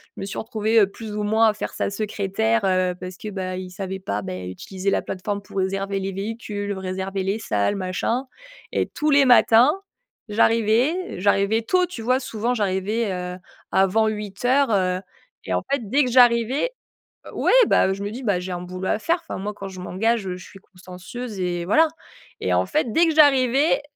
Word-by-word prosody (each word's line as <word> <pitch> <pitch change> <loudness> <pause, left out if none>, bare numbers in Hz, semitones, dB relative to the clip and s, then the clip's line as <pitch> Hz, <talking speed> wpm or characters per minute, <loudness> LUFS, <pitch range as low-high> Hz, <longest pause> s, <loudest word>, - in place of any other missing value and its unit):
Je - - -8
me - - -3
suis 195 - -5
retrouvée 220 -1 +2
plus 210 +1 -8
ou 210 - -2
moins, 220 +2 +3
à - - 0
faire 210 - -5
sa - - -1
secrétaire, 215 +2 0
heu, 185 -1 +1
parce 180 0 -7
que, 215 - -7
bah, 185 -2 -4
il 185 0 -6
savait 190 +1 -5
pas, 105 - -3
ben, 90 -1 -5
utiliser 185 - -4
la - - 0
plateforme 200 +2 -4
pour 200 - -10
réserver 195 +1 -1
les 195 0 -4
véhicules, 205 0 -4
réserver 190 0 -4
les 195 +3 -1
salles, 105 - 0
machin 195 +7 -2 0.5
et - - 0
tous 300 0 -1
les 280 -1 +6
matins, 245 +2 +6 0.6
j'arrivais 230 - +2
j'arrivais 200 +3 +2
tôt, 365 +10 +2
tu 340 -10 -8
vois? 255 +3 +2
Souvent, 235 -1 -2
j'arrivais, 205 +1 -1
heu, 180 0 -5 0.3
avant 195 +4 +3
8:00, 220 +6 0
heu 185 -3 +1 0.5
et - - -2
en - - 0
fait, 250 -7 -1
dès 280 +6 +3
que 250 - -2
j'arrivais 245 - +4 0.6
ouais, - - +1
bah, - - +4
heu, 190 - +1
je 195 +1 -6
me 205 - -3
dis: 245 +4 -7
«Bah 200 -6 +1
j'ai 185 +1 -5
un 175 - -3
boulot 185 +1 -5
à - - +1
faire». 335 +10 +1
Enfin - - -7
moi, 205 +2 -4
quand 195 -1 -8
je 185 -1 -10
m'engage, 225 +6 0
je 185 -2 -4
suis 185 +2 -12
consciencieuse 190 +5 -9
et 175 -1 -1
voilà, 315 - +4 0.5
et - - 0
en - - +2
fait, 295 -6 0
dès 335 +1 +4
que 320 - 0
j'arrivais, 275 -1 +4
205 Hz, 200 wpm, -23 LUFS, 190-235 Hz, 0.6 s, les